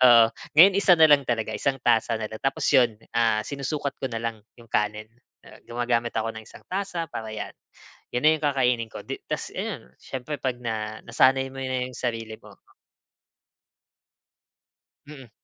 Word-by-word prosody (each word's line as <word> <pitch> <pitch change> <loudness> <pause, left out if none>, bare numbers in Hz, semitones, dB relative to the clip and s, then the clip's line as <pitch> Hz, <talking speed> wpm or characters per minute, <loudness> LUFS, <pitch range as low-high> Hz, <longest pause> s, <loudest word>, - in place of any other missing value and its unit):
Oo, 120 -2 +9 0.3
ngayon 190 +3 +9
isa 190 -2 +6
na 160 - +8
lang 145 -1 +6
talaga. 115 -3 -2
Isang 135 -1 0
tasa 115 -2 +2
na 110 - -3
lang 110 +3 -9
tapos 135 0 0
yun, 120 -4 +4 0.2
ah, 115 -2 +3
sinusukat 140 0 -3
ko 130 - -2
na 115 - -3
lang 115 -2 -4 0.2
yung 115 -1 -16
kanin. 105 +1 -1 0.3
Ah, - - -15
gumagamit 120 0 -1
ako 110 +1 -1
ng 110 - -8
isang - - -14
tasa 185 -3 -2
para 110 - -5
'yan. - - -5 0.6
'Yon 125 +4 -2
na 155 - +8
yung - - -18
kakainin 125 -5 +1
ko. - - -9
Di - - -6
tapos - - -4
ayun. - - -4 0.2
Siyempre 135 +2 -6
'pag 130 -2 -1
na 110 -2 -3
nasanay 130 +3 +3
mo 135 - -7
na 130 -1 -1
'yong 130 - -9
sarili 115 -3 -3
mo - - -16 2.5
Mm. 135 -5 -11
125 Hz, 175 wpm, -25 LUFS, 115-135 Hz, 2.5 s, Oo